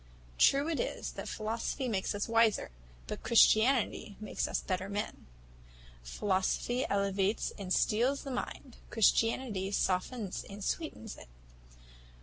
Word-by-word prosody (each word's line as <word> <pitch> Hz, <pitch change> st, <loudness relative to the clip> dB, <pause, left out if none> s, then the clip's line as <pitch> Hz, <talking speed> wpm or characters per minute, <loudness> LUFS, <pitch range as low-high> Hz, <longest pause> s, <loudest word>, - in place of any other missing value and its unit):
True 280 Hz, +2 st, +5 dB
it 330 Hz, -2 st, -1 dB
is, -, -, -3 dB
that -, -, -7 dB
philosophy 225 Hz, +5 st, -3 dB
makes 200 Hz, -3 st, -1 dB
us 205 Hz, -, -2 dB
wiser, 230 Hz, -, +2 dB, 0.3 s
but -, -, -6 dB
Christianity 230 Hz, -2 st, +3 dB
makes 215 Hz, -, -2 dB
us -, -, -1 dB
better 185 Hz, 0 st, -3 dB
men. 205 Hz, -, -4 dB, 0.7 s
Philosophy 190 Hz, -, 0 dB
elevates 200 Hz, +1 st, 0 dB
and 190 Hz, -2 st, -6 dB
steels 245 Hz, +9 st, +2 dB
the 275 Hz, -, -5 dB
mind, 250 Hz, 0 st, -5 dB
Christianity 225 Hz, -2 st, +2 dB
softens 195 Hz, +2 st, -1 dB
and 200 Hz, 0 st, -9 dB
sweetens 265 Hz, -, -4 dB
it. -, -, -12 dB
215 Hz, 125 wpm, -32 LUFS, 195-245 Hz, 0.7 s, True